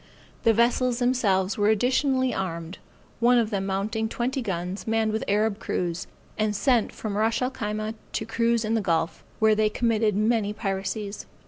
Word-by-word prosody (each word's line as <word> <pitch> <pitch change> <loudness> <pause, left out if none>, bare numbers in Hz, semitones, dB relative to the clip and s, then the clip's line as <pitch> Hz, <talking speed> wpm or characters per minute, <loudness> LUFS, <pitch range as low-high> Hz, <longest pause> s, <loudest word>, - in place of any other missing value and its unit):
The 230 - +7
vessels 240 +2 +2
themselves 215 -7 +1
were 205 - +3
additionally 260 +3 +2
armed, 170 -2 -4 0.4
one 240 +1 +5
of 230 -2 +1
them 195 -1 -1
mounting 215 +3 -1
twenty 255 +4 -2
guns, 185 -2 -4
manned 225 -1 +1
with 220 - -1
Arab 210 +1 +1
crews, 175 -3 -2 0.3
and 215 -1 +1
sent 245 +1 +2
from 210 -2 -5
Ras 220 +2 +1
el 255 +1 0
Khyma 215 -2 -3 0.2
to 220 - -2
cruise 230 0 +1
in 220 - 0
the 225 - +2
gulf, 165 -4 -1
where 220 0 +4
they 215 0 +2
committed 220 -2 +1
many 215 0 +1
piracies. 200 0 -4
215 Hz, 165 wpm, -26 LUFS, 200-235 Hz, 0.4 s, The